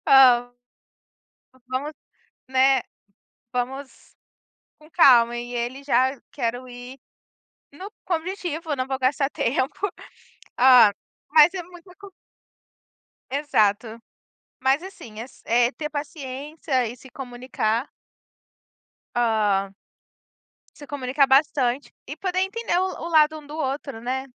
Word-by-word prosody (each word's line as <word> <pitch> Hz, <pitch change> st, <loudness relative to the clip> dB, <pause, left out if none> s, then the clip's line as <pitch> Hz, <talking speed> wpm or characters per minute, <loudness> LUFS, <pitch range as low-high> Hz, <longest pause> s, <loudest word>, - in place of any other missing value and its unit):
"Ó, 245 Hz, -3 st, +6 dB, 1.2 s
vamos, 275 Hz, +4 st, -3 dB, 0.6 s
né, 265 Hz, -1 st, +4 dB, 0.7 s
vamos 260 Hz, +2 st, -5 dB, 0.6 s
com 305 Hz, 0 st, -19 dB
calma", 240 Hz, -8 st, +6 dB
e 240 Hz, +1 st, -6 dB
ele 245 Hz, +3 st, -3 dB
já 260 Hz, 0 st, +2 dB
"quero 245 Hz, -1 st, -3 dB
ir 245 Hz, +2 st, -10 dB, 0.8 s
no" 375 Hz, +8 st, -10 dB
com 355 Hz, -, +1 dB
objetivo, 330 Hz, -2 st, -5 dB
"eu -, -, +1 dB
não 255 Hz, -1 st, -3 dB
vou 265 Hz, -, -2 dB
gastar 270 Hz, +2 st, +1 dB
tempo". 275 Hz, +12 st, -1 dB, 0.7 s
Ah, 250 Hz, -5 st, +7 dB, 0.4 s
mas 310 Hz, +4 st, +8 dB
é 365 Hz, -, -3 dB
muita 355 Hz, +1 st, -15 dB
co 400 Hz, -1 st, -12 dB, 1.2 s
Exato. 230 Hz, -5 st, 0 dB, 0.6 s
Mas, 265 Hz, +4 st, +2 dB
assim, 235 Hz, -, -10 dB
é 230 Hz, -, -4 dB
s 255 Hz, -, -16 dB
é 240 Hz, +2 st, +3 dB
ter 300 Hz, 0 st, -5 dB
paciência 285 Hz, -3 st, -3 dB
e 240 Hz, -, -8 dB
se 265 Hz, -, -15 dB
comunicar 245 Hz, -1 st, -3 dB, 1.3 s
hã 210 Hz, -4 st, +1 dB, 1.0 s
se 290 Hz, -, -11 dB
comunicar 275 Hz, 0 st, +1 dB
bastante 270 Hz, -1 st, +2 dB, 0.2 s
e 295 Hz, -, -8 dB
poder 370 Hz, +1 st, -2 dB
entender 400 Hz, -2 st, -2 dB
o 375 Hz, -3 st, -3 dB
o -, -, -3 dB
lado 310 Hz, -1 st, +4 dB
um 295 Hz, -, -16 dB
do 295 Hz, -, -8 dB
outro, 275 Hz, -5 st, -4 dB
né. 260 Hz, +2 st, -3 dB
265 Hz, 120 wpm, -24 LUFS, 245-300 Hz, 1.3 s, mas